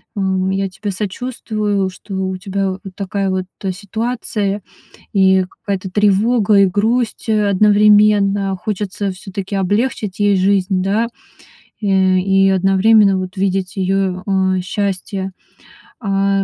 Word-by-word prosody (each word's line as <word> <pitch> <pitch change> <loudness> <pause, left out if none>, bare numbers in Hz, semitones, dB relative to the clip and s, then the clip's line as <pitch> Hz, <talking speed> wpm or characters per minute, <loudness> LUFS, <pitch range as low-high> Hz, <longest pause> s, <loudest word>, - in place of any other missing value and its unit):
ам, 190 -1 0
я 195 0 0
тебе 200 +3 -6
сочувствую, 210 -1 -2
что 190 +1 -9
у 190 0 -2
тебя 195 -1 -2 0.2
такая 195 0 -2
вот 185 -1 -1 0.3
ситуация 210 0 -3 0.5
и 190 -2 +4
какая-то 195 -2 -5
тревога, 210 +2 +3
и 200 -1 +6
грусть 220 +5 -1
одновременно. 205 -1 +4
Хочется 200 0 -3
всё-таки 195 +1 -6
облегчить 205 +1 -1
ей 205 -1 +3
жизнь, 190 0 +1
да, 210 +5 0 0.7
э, - - -4
и 190 0 +3
одновременно 195 +2 +4
вот 185 +1 -6
видеть 190 0 -1
ее, 190 -1 -1
а, 190 -1 +1
счастье, 195 0 -3 0.7
а. 195 -1 +1
195 Hz, 115 wpm, -17 LUFS, 190-205 Hz, 0.7 s, и